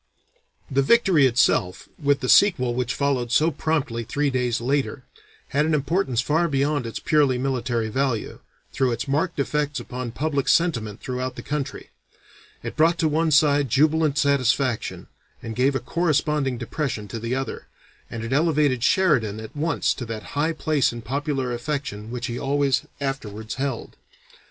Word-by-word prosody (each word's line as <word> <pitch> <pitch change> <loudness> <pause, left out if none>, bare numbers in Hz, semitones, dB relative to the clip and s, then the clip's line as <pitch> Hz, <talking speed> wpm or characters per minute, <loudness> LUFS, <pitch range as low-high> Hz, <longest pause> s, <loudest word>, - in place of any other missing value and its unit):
The 135 +1 +3
victory 180 - +4
itself, 100 -6 +1
with 140 -1 +2
the 130 - -2
sequel 145 -9 +4
which 125 +1 -2
followed 135 -4 0
so 155 +6 +3
promptly 135 -7 -1
three 145 +4 -1
days 125 -2 0
later, 135 +2 -1 0.5
had 145 +2 +2
an 160 - +2
importance 140 -3 0
far 160 +6 +1
beyond 140 -3 0
its 115 - -5
purely 145 -5 +2
military 125 -3 -1
value, 130 -1 -2 0.3
through 130 -3 +1
its 115 - -4
marked 160 +5 0
effects 145 +1 -1
upon 125 -1 -5
public 140 0 -1
sentiment 115 - +1
throughout 130 0 -4
the - - -8
country; 140 -2 -4 0.7
it - - -5
brought 165 +2 +3
to 165 -2 +2
one 160 +2 +1
side 145 -2 +4
jubilant 150 +3 +2
satisfaction, 135 -3 +1 0.4
and 115 -1 -5
gave 135 +3 +2
a - - +1
corresponding 150 -2 0
depression 120 -3 -3
to 115 +4 -6
the 115 +3 -2
other, 135 0 -4 0.4
and 115 -1 -6
it 115 +3 -3
elevated 145 -5 +2
Sheridan 125 - +2
at 110 +4 -9
once 155 +2 0
to 125 - -6
that 110 -1 -5
high 155 +3 +1
place 155 -3 +1
in 120 -1 -8
popular 135 +1 -2
affection 120 -5 -4
which 125 0 -4
he 120 0 -4
always 140 -1 +1
afterwards 110 -6 -4
held. 135 -4 -4
135 Hz, 160 wpm, -23 LUFS, 120-150 Hz, 0.7 s, victory